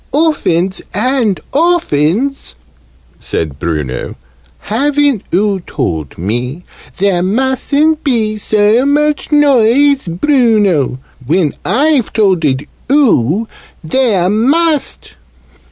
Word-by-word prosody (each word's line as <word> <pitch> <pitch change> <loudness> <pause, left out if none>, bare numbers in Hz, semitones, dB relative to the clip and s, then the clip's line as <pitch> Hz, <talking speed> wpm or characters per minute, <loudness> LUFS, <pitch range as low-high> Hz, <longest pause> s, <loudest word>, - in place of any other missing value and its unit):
"Oftens 195 - +1
and 225 - 0
oftens," 275 - 0 0.6
said 75 -4 -4
Bruno, 75 -6 -4 0.5
"haven't 280 +1 0
oo 200 +1 +1
told 80 - -4
me 120 - -3 0.3
'There 190 -2 +1
mustn't 265 - 0
be 225 -6 0
so 210 +3 +2
much 295 +2 0
noise, 280 -2 +3
Bruno!' 205 - +1 0.3
when 155 +3 0
I've 270 - +1
tolded 170 -11 +1 0.3
oo 225 - +2 0.4
'There 200 -1 +1
must!' 285 - 0
215 Hz, 85 wpm, -13 LUFS, 170-280 Hz, 0.6 s, noise